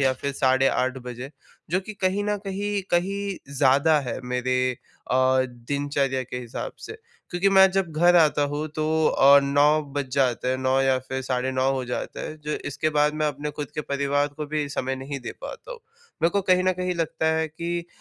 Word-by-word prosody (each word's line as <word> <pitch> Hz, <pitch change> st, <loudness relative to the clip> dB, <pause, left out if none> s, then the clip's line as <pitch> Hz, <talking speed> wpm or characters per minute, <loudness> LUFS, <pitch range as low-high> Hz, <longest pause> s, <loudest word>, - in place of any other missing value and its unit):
या 130 Hz, -1 st, +3 dB
फिर 140 Hz, +2 st, -4 dB
8:30 130 Hz, 0 st, +2 dB
बजे 125 Hz, +3 st, -7 dB, 0.4 s
जो 185 Hz, +2 st, +2 dB
कि 215 Hz, +3 st, -9 dB
कहीं 195 Hz, +1 st, 0 dB
न 210 Hz, 0 st, 0 dB
कहीं 200 Hz, +1 st, -2 dB
कहीं 195 Hz, +2 st, 0 dB, 0.2 s
ज़्यादा 140 Hz, +3 st, +4 dB
है 125 Hz, -2 st, -5 dB
मेरे 125 Hz, +1 st, -1 dB, 0.5 s
अ, -, -, +2 dB, 0.3 s
दिनचर्या 135 Hz, +2 st, -2 dB
के 125 Hz, 0 st, -7 dB
हिसाब 120 Hz, -1 st, -6 dB
से। -, -, -7 dB, 0.4 s
क्योंकि 175 Hz, +3 st, +2 dB
मैं 190 Hz, 0 st, +7 dB
जब 190 Hz, -3 st, 0 dB
घर 175 Hz, +2 st, +5 dB
आता 150 Hz, -3 st, +4 dB
हूँ 150 Hz, +1 st, -2 dB
तो 155 Hz, -, 0 dB, 0.2 s
अ, 140 Hz, +1 st, +6 dB
9:00 145 Hz, +2 st, +3 dB
बज 140 Hz, -2 st, -3 dB
जाते 125 Hz, -2 st, +1 dB
है 130 Hz, -, +1 dB
9:00 130 Hz, +1 st, +1 dB
या 135 Hz, -1 st, +2 dB
फिर 130 Hz, 0 st, -3 dB
9:30 130 Hz, +1 st, 0 dB
हो 130 Hz, -1 st, -2 dB
जाता 125 Hz, -, -5 dB
है 155 Hz, -, -6 dB
जो 150 Hz, -, -2 dB, 0.2 s
इसके 155 Hz, +3 st, -1 dB
बाद 150 Hz, +1 st, +3 dB
मैं 155 Hz, 0 st, 0 dB
अपने 145 Hz, +1 st, -4 dB
ख़ुद 145 Hz, -2 st, -5 dB
के 150 Hz, -, -2 dB
परिवार 140 Hz, 0 st, 0 dB
को 150 Hz, -1 st, -4 dB
भी 150 Hz, -1 st, -2 dB
समय 130 Hz, -1 st, -2 dB
नहीं 135 Hz, +1 st, -6 dB
दे -, -, -6 dB
पाता -, -, -8 dB
हूँ। -, -, -10 dB, 0.4 s
मेरे 165 Hz, -, +4 dB
को 200 Hz, -, +1 dB
कहीं 185 Hz, -1 st, +3 dB
न 185 Hz, -, +3 dB
कहीं 180 Hz, 0 st, -2 dB
लगता 165 Hz, -1 st, -2 dB
है 160 Hz, 0 st, 0 dB
कि 170 Hz, +2 st, -4 dB
145 Hz, 200 wpm, -24 LUFS, 130-175 Hz, 0.5 s, मैं